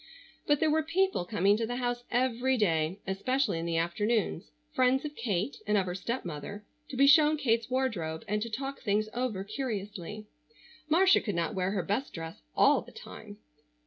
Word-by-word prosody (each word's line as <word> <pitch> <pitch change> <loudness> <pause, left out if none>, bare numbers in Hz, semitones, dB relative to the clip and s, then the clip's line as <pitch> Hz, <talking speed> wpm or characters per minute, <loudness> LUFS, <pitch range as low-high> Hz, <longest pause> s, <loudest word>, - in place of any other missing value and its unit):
But 290 -1 +3
there 315 -1 +2
were 315 +1 +3
people 335 - 0
coming 200 +1 +3
to 225 0 -1
the 245 - -3
house 245 -1 -2
every 255 +1 +1
day, 165 -4 +1
especially 205 +1 0
in 165 - -3
the 165 -1 0
afternoons, 175 - 0 0.2
friends 255 +2 +2
of 295 0 -6
Kate, 220 +1 -2
and 210 0 +3
of 195 - +2
her 180 - -3
stepmother, 195 - -5 0.2
to 260 - -6
be 275 - +6
shown 300 +1 +6
Kate's 230 -5 +1
wardrobe, 220 -12 -2
and 210 +1 -1
to 230 - -3
talk 270 +5 -4
things 215 0 0
over 235 -6 -2
curiously. 210 -3 -5 0.6
Marcia 370 +5 +5
could 205 -5 -3
not 170 +4 -1
wear 185 -1 0
her 195 -2 -1
best 215 +10 -2
dress 165 -1 -7
all - - +5
the - - -14
time. - - -11
220 Hz, 180 wpm, -30 LUFS, 190-260 Hz, 0.6 s, be